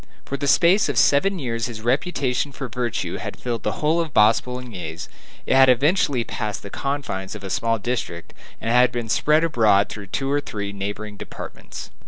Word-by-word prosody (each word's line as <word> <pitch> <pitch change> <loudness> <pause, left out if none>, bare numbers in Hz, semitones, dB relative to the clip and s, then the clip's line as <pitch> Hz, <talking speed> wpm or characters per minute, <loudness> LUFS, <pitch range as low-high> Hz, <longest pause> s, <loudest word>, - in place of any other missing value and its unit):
For 140 - -4
the 140 +1 -2
space 175 +6 +4
of 140 - -2
seven 145 - +4
years 115 -6 -2
his 115 -3 -7
reputation 135 +1 0
for 135 -1 -6
virtue 120 -1 -3
had - - -6
filled 120 -2 -3
the - - -1
whole 160 +3 +3
of 160 -5 -5
Bas 105 +2 +6
Boulonnais; 115 -11 -6 0.4
it - - +1
had 135 0 +7
eventually 140 -1 +3
passed 105 -3 -4
the 100 - -8
confines 135 -9 -3
of 105 - -9
a 95 - -5
small 115 +4 +1
district 110 -7 -4 0.3
and 115 - -2
had 125 +1 +5
been 120 -2 -4
spread 150 +7 +3
abroad 110 -10 +3
through 100 -2 -8
two 135 +8 -2
or 145 0 +2
three 100 -5 -5
neighboring 105 +1 -5
departments. - - -9
120 Hz, 190 wpm, -23 LUFS, 105-140 Hz, 0.4 s, had